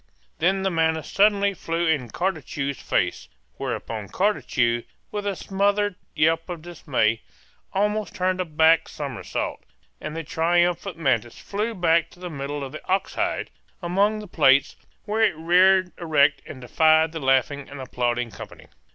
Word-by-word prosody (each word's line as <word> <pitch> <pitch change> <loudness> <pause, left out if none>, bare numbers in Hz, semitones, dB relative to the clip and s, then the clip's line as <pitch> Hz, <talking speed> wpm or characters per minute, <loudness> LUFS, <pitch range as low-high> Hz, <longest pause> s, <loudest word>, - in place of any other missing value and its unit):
Then 190 +3 +2
the 195 - +1
mantis 160 -2 0
suddenly 200 0 +3
flew 170 -1 -2
in 145 -7 0
Cartucho's 145 - -3
face, - - -1 0.3
whereupon 110 -3 -4
Cartucho, 120 - +1 0.3
with 205 -1 -3
a 200 - -1
smothered 205 +2 0 0.2
yelp 165 +2 +2
of 170 -3 -6
dismay, 135 -10 0 0.5
almost 210 +2 -1
turned 185 0 0
a - - -2
back 160 0 +3
somersault; 140 -5 -4 0.4
and 150 - -5
the 165 - -3
triumphant 175 +3 +1
mantis 120 -7 0
flew 215 +3 -3
back 170 -2 +2
to - - -19
the 180 -1 -6
middle 140 0 -4
of 135 - -6
the 155 - -9
ox 190 +1 0
hide, - - -2 0.3
among 200 +4 +1
the 210 -1 -8
plates, 140 -5 +3 0.3
where 215 +1 -1
it 205 -7 +3
reared 180 +3 +4
erect 150 -4 +3
and 130 - -9
defied 160 +5 +3
the 160 - -5
laughing 135 +1 +1
and 140 - -9
applauding 120 -2 -2
company. - - -11
165 Hz, 150 wpm, -24 LUFS, 140-190 Hz, 0.5 s, reared